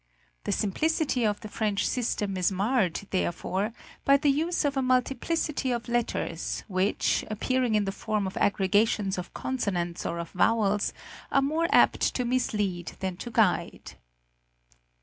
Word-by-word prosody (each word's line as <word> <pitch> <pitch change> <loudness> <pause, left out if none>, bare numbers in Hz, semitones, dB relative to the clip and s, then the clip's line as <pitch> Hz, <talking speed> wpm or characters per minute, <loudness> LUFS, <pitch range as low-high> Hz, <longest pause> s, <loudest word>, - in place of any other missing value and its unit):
The - - 0
simplicity 275 +5 0
of 210 0 -2
the - - -7
French 210 -1 -1
system 210 -5 -1
is 185 0 +1
marred, 200 -2 +1
therefore, 190 +3 -1 0.3
by 275 0 +6
the 285 0 +3
use 320 +4 0
of 285 0 0
a 270 - +1
multiplicity 265 +3 0
of 240 -1 -2
letters, 240 0 -2
which, 190 0 +1
appearing 245 +2 0
in 210 -1 +2
the 195 - -1
form 210 0 -2
of 190 - -5
aggregations 200 0 +2
of 175 - -7
consonants 185 -10 -2
or 170 - -3
of 170 -1 -5
vowels, 210 +1 +2 0.4
are 275 - +3
more 315 +4 +1
apt - - +4
to 250 - 0
mislead 210 -8 -1
than 190 -1 -2
to 240 - -6
guide. 185 -7 +1
215 Hz, 150 wpm, -27 LUFS, 190-255 Hz, 0.4 s, by